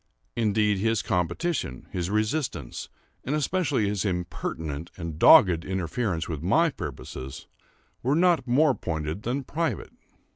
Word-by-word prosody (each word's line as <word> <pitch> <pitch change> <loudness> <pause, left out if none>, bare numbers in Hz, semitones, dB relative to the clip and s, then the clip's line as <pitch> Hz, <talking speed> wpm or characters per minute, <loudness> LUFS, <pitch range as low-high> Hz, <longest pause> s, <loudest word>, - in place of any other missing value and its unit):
Indeed, 105 -3 +2
his 115 +1 +1
competition, 90 - -1
his 90 -1 -2
resistance, 110 - -2 0.3
and 140 - -1
especially 150 - +1
his 100 -1 -1
impertinent 85 -4 -3
and 85 -3 -6
dogged 85 -3 +7
interference 95 0 -2
with 80 -4 -4
my 160 - +3
purposes, 70 - -7 0.6
were 135 +4 +1
not 170 -6 +3
more 140 +4 +4
pointed 80 -2 -4
than 130 +5 -2
private. 165 +5 -3
105 Hz, 120 wpm, -26 LUFS, 85-135 Hz, 0.6 s, dogged